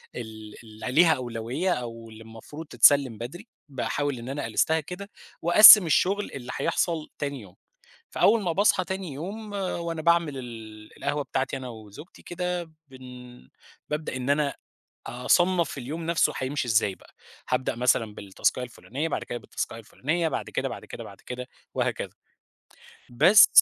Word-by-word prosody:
ال 110 -2 -8
اللي 110 +2 -7
ليها 160 +4 +5
أولوية 125 +7 -2
أو 115 -2 -7
اللي 110 0 -12
المفروض 115 +8 -10
تتسلّم 130 -2 +4
بدري 140 - -8 0.2
باحاول 140 0 -2
إن 120 +3 -8
أنا 145 +1 -3
ألستها 160 0 +1
كده 180 +6 -8 0.3
وأقسّم 205 +3 +10
الشغل 195 +5 +1
اللي 125 -3 -7
هيحصَل 165 -3 -1
تاني 140 -3 -3
يوم، 95 -3 -15 0.6
فأول 230 - +3
ما 175 - 0
باصحى 190 +1 +3
تاني 190 -5 -5
يوم 205 +9 -7
وأنا 170 -4 -3
باعمل 170 -4 +2
ال 110 -3 -10
القهوة 145 +1 -2
بتاعتي 135 0 -2
أنا 130 -1 -7
وزوجتي 110 - -12
كده، 175 -1 -4 0.2
بن 125 -1 -13 0.4
بابدأ 150 -2 -3
إن 130 +2 -4
أنا 145 -1 +1 0.5
أصنّف 170 +7 +1
اليوم 155 +6 -6
نَفسه 170 0 +2
هيمشي 130 -1 -2
إزاي 110 -3 +2
بقى، - - -21 0.4
هابدأ 125 -1 0
مثلًا 115 -3 +1
بالتاسكاية 100 +6 -1
الفُلانية، 130 +5 -5
بَعد - - -3
كده 120 - -5
بالتاسكاية 115 - -5
الفُلانية، 155 +9 -2
بَعد - - -4
كده، - - -2
بَعد - - -8
كده، - - -9
بَعد - - -13
كده 125 0 -7 0.3
وهكذا - - -2 1.0
بس 190 - +7
140 Hz, 150 wpm, -26 LUFS, 120-170 Hz, 1.0 s, وأقسّم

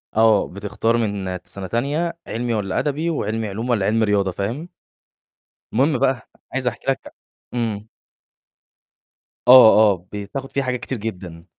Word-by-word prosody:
آه، 110 -2 +4
بتختار 105 +4 -1
من 100 -5 -2
سَنة 95 -1 -7
تانية، 145 - -1
علمي 120 +1 -2
والّا 100 -4 -1
أدبي، 150 +3 -1
وعلمي 110 -7 -2
علوم 110 +5 -4
والّا 110 -5 +2
علمي 110 +2 +2
رياضة 100 -2 +1
فاهم؟ 115 - -4 1.0
المهم 140 +7 +2
بقى 130 -4 0 0.2
عايز 130 -1 -1
أحكي 120 -1 -4
لك 135 - -2
ع - - -9 0.4
إمم. 110 -3 -2 1.6
آه، 110 -4 +9
آه، 90 -1 -10
بتاخد 105 +7 -6
فيه 140 - 0
حاجات 125 -1 -2
كتير 120 +3 -4
جدًا. 90 -6 -7
110 Hz, 145 wpm, -21 LUFS, 100-130 Hz, 1.6 s, آه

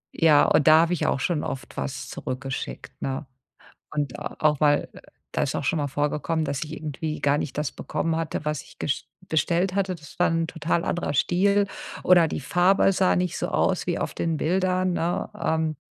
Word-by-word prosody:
Ja, 155 -3 +6
und 145 - +3
da 155 +1 +8
habe 170 +1 +1
ich 175 - 0
auch - - +1
schon 150 +3 0
oft 135 - -6
was 65 0 -4
zurückgeschickt, 135 +1 -6
ne? 135 +2 -3 0.7
Und 145 -4 -2
auch 150 -2 0
mal 145 -1 +3
äh, - - -11 0.3
da - - 0
ist - - -1
auch - - -2
schon 165 - +1
mal 145 -1 -1
vorgekommen, 150 +3 -1
dass 140 -1 -3
ich 150 - -9
irgendwie 155 0 -4
gar 145 +1 +2
nicht 150 - -4
das 150 -2 -1
bekommen 165 -1 -2
hatte, 160 -2 -3
was 150 -2 -2
ich - - -18
gest 145 - -2 0.2
bestellt 170 +4 +1
hatte. 195 -2 0
Das 150 -4 -13
war - - +4
'n 165 0 +1
total 165 +1 -1
anderer 175 - -1
Stil 200 +8 +3 0.4
oder 175 -3 +6
die - - -3
Farbe 180 +6 +3
sah 185 0 +3
nicht 180 -1 0
so - - -2
aus - - +1
wie - - 0
auf - - -3
den 165 -1 -1
Bildern, 185 +2 +1
ne? 175 +1 -1
Ähm, 160 -1 0
160 Hz, 200 wpm, -25 LUFS, 150-175 Hz, 0.7 s, da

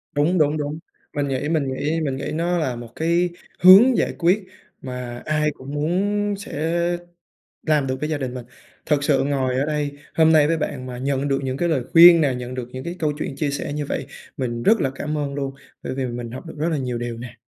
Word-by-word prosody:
Đúng, 155 +6 +2
đúng, 150 -1 +2
đúng. 150 +1 -3 0.4
Mình 145 -1 0
nghĩ 135 +2 -2
mình 155 -4 +1
nghĩ 155 +5 -1
mình 140 -4 -1
nghĩ 140 - -4
nó 170 +3 0
là 135 -7 -1
một 120 -1 -8
cái 170 +2 +1 0.3
hướng 205 +8 +8
giải - - +1
quyết 185 +4 +2 0.4
mà 125 -2 -6
ai 150 0 +1
cũng 140 0 -10
muốn 200 +7 0
sẽ 165 -4 -3 0.9
làm 150 -3 +2
được 130 0 -3
với 150 - -2
gia 155 -2 -1
đình 130 -3 -4
mình. 125 -2 -7 0.4
Thật 145 -2 +1
sự 140 -3 +2
ngồi 135 -2 0
ở 135 - +1
đây, 145 -2 -2 0.2
hôm 160 0 +5
nay 155 -2 +6
với 165 - +2
bạn 140 -4 -4
mà 125 -1 -6
nhận 140 +1 -1
được 135 -1 +1
những 130 -1 -2
lời 160 -7 +1
khuyên 170 0 +9
nè, 140 -4 +2
nhận 125 0 -6
được 125 -2 -5
những 170 +8 -6
câu 155 -3 0
chuyện 135 - -4
chia 145 0 -1
sẻ 140 +1 -4
như 145 0 -3
vậy, - - -3 0.3
mình 120 -4 -3
rất 220 - +4
là 135 - +1
cảm 150 +2 -3
ơn 140 -1 -3
luôn, 135 -1 -3 0.3
bởi - - -4
vì 130 -1 -2
mình 120 -1 -5
học 130 +8 -8
được 160 - -8
rất 155 +3 0
là 160 - 0
nhiều 125 -3 -3
điều 120 -1 -4
nè. 120 0 -9
145 Hz, 235 wpm, -22 LUFS, 130-160 Hz, 0.9 s, khuyên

